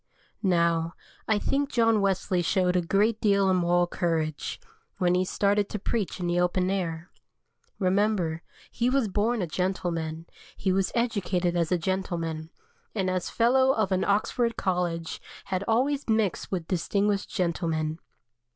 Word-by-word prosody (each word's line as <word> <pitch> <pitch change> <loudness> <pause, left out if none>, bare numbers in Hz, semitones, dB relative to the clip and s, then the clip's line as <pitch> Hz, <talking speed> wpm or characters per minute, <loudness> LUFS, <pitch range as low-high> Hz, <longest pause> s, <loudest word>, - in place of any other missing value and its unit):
Now, 170 -3 +1 0.3
I 220 - +3
think 275 +6 0
John 225 -5 +3
Wesley 190 -2 +1
showed 180 +1 +1
a 180 - +3
great 205 +6 +1
deal 200 -2 +3
of - - +3
moral 175 0 +3
courage 165 -3 -2 0.4
when 180 -1 +2
he 180 +1 +3
started 200 +2 +1
to - - -3
preach 205 -1 -2
in 180 - -2
the 175 0 +1
open 180 +1 +1
air. 175 -3 -3 0.7
Remember, 185 -4 +1 0.3
he 240 +1 +1
was 265 -3 +2
born 210 +2 0
a - - 0
gentleman, 165 -2 -2 0.3
he 190 - 0
was 190 0 +1
educated 190 -7 0
as 170 -1 0
a 180 - +3
gentleman, 165 -3 -3 0.5
and 190 -3 0
as 185 -1 -2
Fellow 260 +3 +3
of 215 -5 0
an 185 0 +2
Oxford 230 +3 +1
College 175 -3 -2 0.2
had 190 -1 -2
always 270 +4 +1
mixed 220 -4 0
with 175 -4 -3
distinguished 200 +3 0
gentlemen. 165 -3 -1
185 Hz, 150 wpm, -27 LUFS, 175-210 Hz, 0.7 s, I